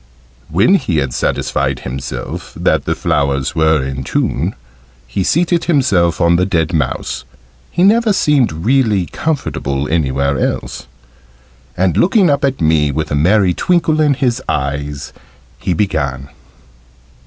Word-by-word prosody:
When 95 - +3
he 130 - +1
had 70 -3 -1
satisfied 70 -2 -1
himself 65 +1 -6
that - - +1
the - - 0
flowers 70 -2 0
were 80 -3 +2
in 65 -1 -4
tune, - - -1 0.5
he 60 +10 -2
seated 170 - +1
himself 100 - +2
on 85 0 +3
the 90 - +2
dead 85 -3 0
mouse 70 -3 -2 0.5
(he 175 - 0
never 220 +3 +4
seemed 150 - +2
really 105 - +1
comfortable 75 - -2
anywhere 70 -3 0
else), - - -3 0.9
and, 90 -2 +1
looking 185 -2 +4
up 140 +1 0
at 135 -1 0
me 80 -2 +2
with 75 +2 -3
a - - +1
merry 90 +5 +3
twinkle 160 - +1
in 145 -2 +3
his 125 -1 0
eyes, 70 0 -3 0.5
he - - -2
began. 70 -8 -1
85 Hz, 135 wpm, -16 LUFS, -, 0.9 s, never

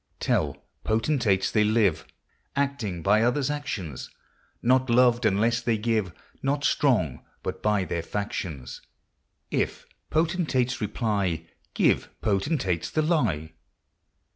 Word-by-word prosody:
Tell - - 0 0.3
potentates 110 -4 +1
they 105 - +3
live 105 -7 +2 0.5
Acting 130 - -1
by 105 +2 +4
others' 130 +4 +1
actions 95 - -4 0.3
— - - -38
Not 130 +1 +3
loved 120 0 +4
unlesse 115 +4 +2
they 115 -2 +1
give, 110 -4 0 0.3
Not 140 +1 0
strong 115 - +2 0.2
but - - -4
by 105 -2 +2
their 85 -2 -2
factions; 80 -10 -5 0.7
If - - -1 0.2
potentates 155 -7 +1
reply, 100 -6 -1 0.3
Give - - +2
potentates 100 - 0
the 155 - 0
lye. 85 - 0
110 Hz, 115 wpm, -26 LUFS, 95-130 Hz, 0.7 s, by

